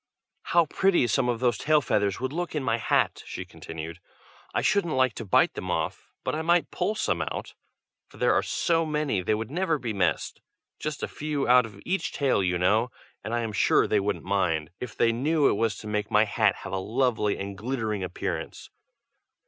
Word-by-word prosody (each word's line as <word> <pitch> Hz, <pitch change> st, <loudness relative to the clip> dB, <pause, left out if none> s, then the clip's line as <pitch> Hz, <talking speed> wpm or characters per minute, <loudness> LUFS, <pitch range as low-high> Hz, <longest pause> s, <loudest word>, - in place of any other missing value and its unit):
"How 170 Hz, -1 st, +4 dB
pretty 190 Hz, -1 st, +2 dB
some 125 Hz, +2 st, +1 dB
of 120 Hz, -2 st, 0 dB
those 120 Hz, -4 st, +1 dB
tail 155 Hz, 0 st, +4 dB
feathers 100 Hz, -7 st, 0 dB
would 130 Hz, +2 st, -3 dB
look 175 Hz, 0 st, -3 dB
in 150 Hz, -, -1 dB
my 115 Hz, -2 st, +1 dB
hat!" -, -, +1 dB
she -, -, -6 dB
continued. 80 Hz, +1 st, -8 dB, 0.5 s
"I -, -, -1 dB
shouldn't 200 Hz, -8 st, +2 dB
like 130 Hz, -3 st, +3 dB
to 115 Hz, -, -6 dB
bite 95 Hz, -, +3 dB
them -, -, -6 dB
off, -, -, -2 dB
but -, -, -1 dB
I 155 Hz, -, -1 dB
might 170 Hz, +1 st, +2 dB
pull 215 Hz, -, -1 dB
some -, -, 0 dB
out, -, -, -4 dB, 0.5 s
for -, -, -17 dB
there -, -, +3 dB
are -, -, +3 dB
so 165 Hz, -1 st, +1 dB
many 150 Hz, -, 0 dB
they 105 Hz, +4 st, +1 dB
would 110 Hz, +3 st, -5 dB
never 165 Hz, -1 st, +1 dB
be 120 Hz, -5 st, -4 dB
missed. 90 Hz, -6 st, -1 dB, 0.4 s
Just 150 Hz, -1 st, -4 dB
a -, -, 0 dB
few 150 Hz, -2 st, -3 dB
out 125 Hz, -1 st, +6 dB
of 100 Hz, -2 st, -14 dB
each 190 Hz, +2 st, -1 dB
tail, 135 Hz, -7 st, +2 dB
you 90 Hz, -2 st, +1 dB
know; 105 Hz, +7 st, +2 dB, 0.3 s
and 110 Hz, -, -5 dB
I 120 Hz, 0 st, 0 dB
am 110 Hz, -2 st, -3 dB
sure 95 Hz, -, +4 dB
they 105 Hz, -, +2 dB
wouldn't 100 Hz, -4 st, -2 dB
mind, 85 Hz, -6 st, 0 dB
if 125 Hz, -, -7 dB
they 115 Hz, -, +4 dB
knew 145 Hz, +5 st, +2 dB
it -, -, +3 dB
was 110 Hz, -2 st, 0 dB
to 105 Hz, -, -9 dB
make 105 Hz, -1 st, -2 dB
my 105 Hz, -, +5 dB
hat -, -, +2 dB
have 95 Hz, 0 st, -6 dB
a 95 Hz, -, 0 dB
lovely 110 Hz, 0 st, 0 dB
and 100 Hz, 0 st, -5 dB
glittering 110 Hz, -2 st, -2 dB
appearance. 90 Hz, -, -5 dB
115 Hz, 210 wpm, -27 LUFS, 100-150 Hz, 0.5 s, out